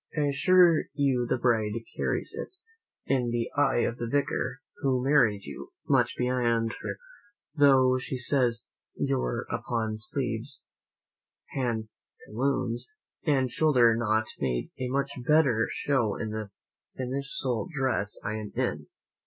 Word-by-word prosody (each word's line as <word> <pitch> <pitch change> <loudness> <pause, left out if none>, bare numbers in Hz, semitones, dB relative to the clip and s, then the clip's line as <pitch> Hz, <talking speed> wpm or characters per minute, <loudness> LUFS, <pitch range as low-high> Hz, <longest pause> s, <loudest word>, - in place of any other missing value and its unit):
I - - +2
assure 165 +4 +4
you 130 -4 +1
the 125 - +2
bride 110 -4 +1 0.2
carries - - -1
it, - - -6 0.5
in 125 -3 +1
the 120 0 -2
eye 145 -4 +3
of 120 - -1
the 120 - -3
vicar 140 +1 -1 0.2
who 130 -2 0
married 120 -8 +3
you, - - -9
much - - +2
beyond 120 -2 +1
her - - -4 0.6
mother 145 -2 +6
though 130 -1 +5
he 130 - -3
says 125 -3 +2 0.3
your 60 -1 -1
open 110 -2 -2
sleeves, 120 +3 -3 0.9
pantaloons, 120 +1 -3 0.4
and 130 -4 +2
shoulder 125 -4 +4
knot 110 -1 +1
made 60 -3 -2
a 130 - -2
much 140 +1 -1 0.2
better 140 -8 +4
show 120 -8 0
than 110 - -4
the 110 -1 -4 0.5
finical 130 -1 -2
dress 130 -8 0
I 110 - -2
am 105 -1 -6
in. - - -2
125 Hz, 130 wpm, -28 LUFS, 115-140 Hz, 0.9 s, mother